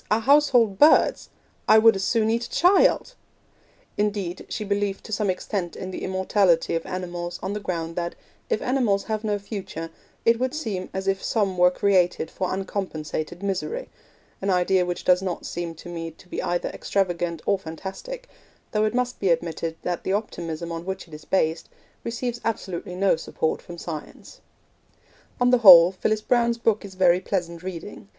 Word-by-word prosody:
our 215 +2 +2
household 250 -6 +4
birds! 305 +2 +5 0.4
I 215 - +7
would 225 0 +6
as 195 - -2
soon 220 0 +2
eat 235 +1 0
a - - -10
child!' 380 +7 +3 0.9
Indeed, 200 -4 -2
she 215 - -3
believed 200 -1 -1
to - - -11
some 210 -1 0
extent 185 -1 -3
in 185 - -6
the - - -6
immortality 190 -2 +2
of 165 0 -1
animals 175 -1 -4
on 190 +2 -2
the 210 - -3
ground 165 -4 -4
that, 170 -1 -2 0.3
if 460 - 0
animals 240 -6 +1
have 215 -1 -3
no 210 -1 0
future, 195 -5 -6 0.3
it 230 0 +4
would 260 +3 -1
seem 210 -12 -4
as 190 0 -4
if 195 0 0
some 200 -4 0
were 180 0 +5
created 180 -3 +1
for 185 - -2
uncompensated 180 -3 -4
misery 200 - -3 0.5
an 195 - -1
idea 180 0 +2
which 175 - -4
does 180 0 +4
not 185 -2 -4
seem 170 -1 -4
to 165 - -12
me 165 -1 -5
to 165 +3 -18
be - - -4
either 175 0 -1
extravagant 175 -4 -2
or 200 -1 +2
fantastic, 200 - -7 0.4
though 215 0 +2
it 215 +2 -1
must 250 0 -1
be 195 - +1
admitted 165 -1 -1
that 175 -1 -2
the 190 - -1
optimism 170 -5 -3
on 165 0 -5
which 190 0 -5
it 165 - -17
is 150 - -10
based 160 -3 0 0.3
receives 235 +1 -3
absolutely 185 -5 -3
no 190 0 +3
support 160 0 -2
from 175 - -10
science. 160 -3 -8 1.0
On 245 0 +4
the 250 - +5
whole, 180 -5 +10
Phyllis 215 +3 -1
Browne's 235 0 +2
book 225 -2 +1
is 195 -2 -10
very 180 -1 +4
pleasant 170 -3 -3
reading. 190 +3 -8
190 Hz, 180 wpm, -24 LUFS, 175-215 Hz, 1.0 s, whole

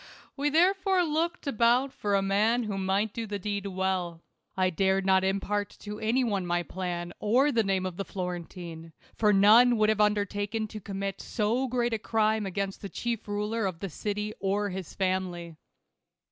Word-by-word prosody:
We 290 +1 0
therefore 370 +3 +3
looked 330 +2 -1
about 250 +1 +2
for 205 -1 -1
a 195 - +2
man 215 +5 +2
who 205 -3 -3
might 195 +2 0
do 230 -1 -4
the 205 0 -3
deed 200 0 -3
well. 185 -3 -2 0.3
1 185 -1 +2
dared 190 +2 +1
not 190 -1 +4
impart 200 +1 -1
to 210 0 -6
any 235 +4 +1
one 205 -5 0
my 175 0 0
plan, 175 -1 -4
or 255 +7 +3
the 230 - +3
name 190 -2 0
of 180 -2 -5
the 195 - -2
Florentine; 175 -3 -6 0.2
for 210 -2 +3
none 220 +5 +6
would 215 0 +3
have 215 -1 +2
undertaken 210 +1 0
to 215 - -7
commit 195 -1 -4
so 235 +4 0
great 240 -1 0
a 225 - 0
crime 220 -1 +1
against 195 +1 -3
the 200 - -6
chief 235 0 -3
ruler 210 +1 -1
of 175 -3 -5
the 195 -3 -5
city 210 +4 -3
or 200 +1 0
his 185 -2 -7
family. 185 -3 -2
205 Hz, 180 wpm, -28 LUFS, 190-225 Hz, 0.3 s, none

